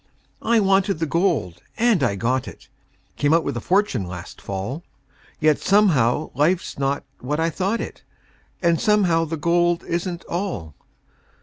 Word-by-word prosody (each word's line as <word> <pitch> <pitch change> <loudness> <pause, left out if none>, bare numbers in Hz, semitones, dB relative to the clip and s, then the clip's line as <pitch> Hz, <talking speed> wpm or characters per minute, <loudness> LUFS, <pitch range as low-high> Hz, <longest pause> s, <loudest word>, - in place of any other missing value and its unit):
I 230 +1 +3
wanted 195 -2 +2
the 165 - -1
gold, 160 - 0 0.2
and 230 -7 +3
I 115 -7 +1
got 125 +5 -1
it - - -12 0.5
Came 145 +2 +3
out 165 - +2
with 140 - -3
a 120 - -3
fortune 190 - +1
last 90 0 -9
fall, 100 - -4 0.6
Yet 155 -2 +3
somehow 155 - +3
life's 155 +4 0
not 140 +1 0 0.2
what 150 +5 -2
I 165 +1 +1
thought 195 +7 -1
it, - - -7 0.6
And 170 -1 +3
somehow 190 -7 +3
the 165 +1 -4
gold 175 +2 +2
isn't 175 0 -3
all. 170 - -4
165 Hz, 150 wpm, -22 LUFS, 135-185 Hz, 0.6 s, I